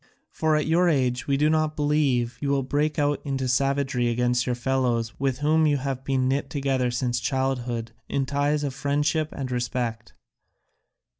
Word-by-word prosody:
For 155 -1 +1
at 150 - +1
your 175 +3 +3
age 125 -5 0
we 140 -1 +2
do 150 +2 +3
not 155 0 +1
believe 145 -5 +1
you 140 - -1
will 140 -1 +1
break 145 +3 0
out 145 -1 +1
into 135 -2 -2
savagery 135 -1 +1
against 125 +1 +1
your 125 - 0
fellows 120 -2 0
with 135 -2 0
whom 155 +1 +4
you 145 -1 +2
have 135 -1 -3
been 135 -2 0
knit 135 +1 -1
together 135 -3 0
since 120 0 -1
childhood 125 -3 -2 0.2
in 135 -1 0
ties 145 +2 0
of 140 -2 -2
friendship 145 +3 0
and 130 -2 -5
respect. 120 -2 -3
135 Hz, 170 wpm, -25 LUFS, 125-145 Hz, 0.2 s, whom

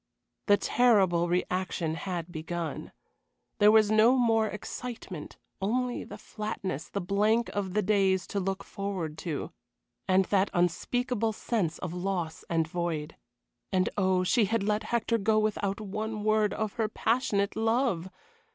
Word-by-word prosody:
The 205 - +6
terrible 190 -10 +3
reaction 180 -2 -1
had 175 0 -4
begun. 165 0 -5 0.7
There 210 0 +7
was 215 -1 +5
no 225 +4 +5
more 225 -3 +3
excitement, 210 -5 -7 0.2
only 245 +5 0
the - - -9
flatness, 195 -8 -5
the 200 - -3
blank 210 +5 +1
of 195 -2 -3
the 210 - +2
days 190 -2 +2
to 200 - -1
look 195 0 -2
forward 190 -6 -4
to, 160 -4 -4 0.6
and 190 0 +4
that 195 +1 +2
unspeakable 225 +6 0
sense 205 -7 -1
of 180 -2 -5
loss 180 -3 -3
and 165 -1 +1
void. 165 -3 -3 0.6
And 185 -1 +2
oh, 185 -2 +2
she 220 +4 +3
had 225 +1 0
let 210 +1 0
Hector 230 0 0
go 215 +2 +2
without 210 -2 0
one 215 +1 -4
word 215 -1 +3
of 215 -1 -2
her 220 - +2
passionate 220 -3 0
love! 225 -5 +1
200 Hz, 140 wpm, -29 LUFS, 180-220 Hz, 0.7 s, There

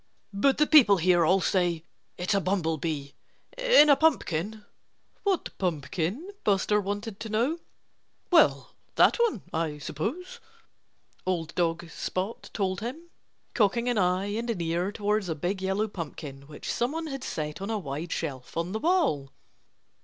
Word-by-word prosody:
"But 265 +8 +3
the 300 - +4
people 250 -11 +7
here 175 0 +4
all 190 +2 +4
say 175 -4 +1 0.3
it's 180 +4 -1
a 200 - +2
bumblebee 160 -6 -1 0.5
in - - +6
a 285 - +7
pumpkin." 215 - 0 0.6
"What 390 -4 -1
pumpkin?" 180 - -2
Buster 210 +1 +2
wanted 205 +1 -4
to 225 0 -6
know. 245 +10 0 0.7
"Well, - - +4 0.2
that - - +5
one 460 - +1
I 160 -2 -1
suppose," 300 - -5 0.8
old 170 -3 -2
dog 170 -1 0
Spot 190 +7 -4
told 190 -3 -1
him, 310 +10 -6 0.4
cocking 235 +2 +2
an 240 -4 +1
eye 185 +2 +1
and 230 +2 -3
an 225 -6 -1
ear 170 +3 -1
towards 210 -2 -1
a 160 - -1
big 180 +5 -2
yellow 195 +3 0
pumpkin, 145 -7 -7
which 150 -1 -5
someone 300 +8 -1
had 270 -4 -5
set 150 -4 -4
on 200 - -4
a 220 - 0
wide 160 -1 -5
shelf 135 -5 -4
on 170 +2 -1
the 220 - -2
wall. 305 - +1
195 Hz, 150 wpm, -27 LUFS, 165-235 Hz, 0.8 s, people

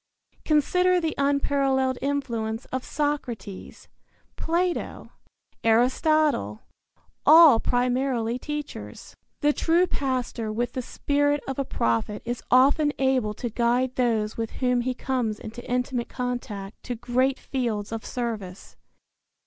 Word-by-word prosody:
Consider 360 +4 +3
the 325 -2 -1
unparalleled 275 -2 +1
influence 235 -5 -2
of 260 0 -2
Socrates, 255 -10 -4 0.5
Plato, 345 +2 -2 0.5
Aristotle 245 - +2 0.6
all 315 -7 +8
primarily 245 -1 0
teachers. 295 +2 -7 0.3
The 295 0 +3
true 340 +4 +3
pastor 255 -7 -2
with 240 +3 -2
the 255 - -2
spirit 290 +3 0
of 270 0 -4
a 275 - 0
prophet 115 - -1
is 240 +1 -3
often 285 +4 +4
able 260 -6 +1
to 240 +1 -4
guide 245 +3 +1
those 225 -4 0
with 225 -1 -3
whom 250 -1 +1
he 255 +1 -2
comes 245 -5 -2
into 230 +3 -8
intimate 250 -1 -1
contact 240 -6 -5
to 245 - -3
great 255 +3 0
fields 225 -6 -3
of 225 -1 -4
service. 215 -7 -5
250 Hz, 115 wpm, -25 LUFS, 230-280 Hz, 0.6 s, all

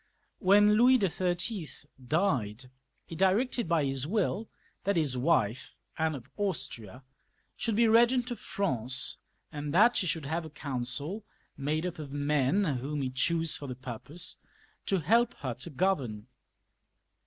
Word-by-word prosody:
When 205 +2 +5
Louis 250 +3 +6
XTTL 180 -3 -2 0.2
died, 130 - 0 0.3
he 165 - -8
settled 200 +6 +2
by 165 -3 +2
his 135 0 -1
will 210 +3 -1 0.3
that 200 0 +1
his 150 -6 +1
wife, 125 -4 +1 0.2
Anne 160 -1 0
of 125 - -9
Austria, 135 - -4 0.5
should 225 -3 -1
be 235 - +4
B^ent 240 +2 +4
of 240 - -4
France, 130 - -1 0.3
and 145 0 -4
that 235 +6 +6
she 190 - +1
should 160 -3 -2
have 165 +4 -2
a 160 - -8
council, 140 - -4 0.3
made 155 +4 -1
up 175 -2 -4
of 145 -3 -7
men 145 +5 +1 0.2
whom 145 +2 -3
he 130 - -2
chose 165 +5 +1
for 145 - -5
the 125 - -5
purpose, 130 +7 -6 0.5
to 195 -3 +1
help 230 +8 +3
her 130 -3 -4
to 130 +8 -6
govern. 135 - -1
160 Hz, 145 wpm, -30 LUFS, 135-200 Hz, 0.5 s, Louis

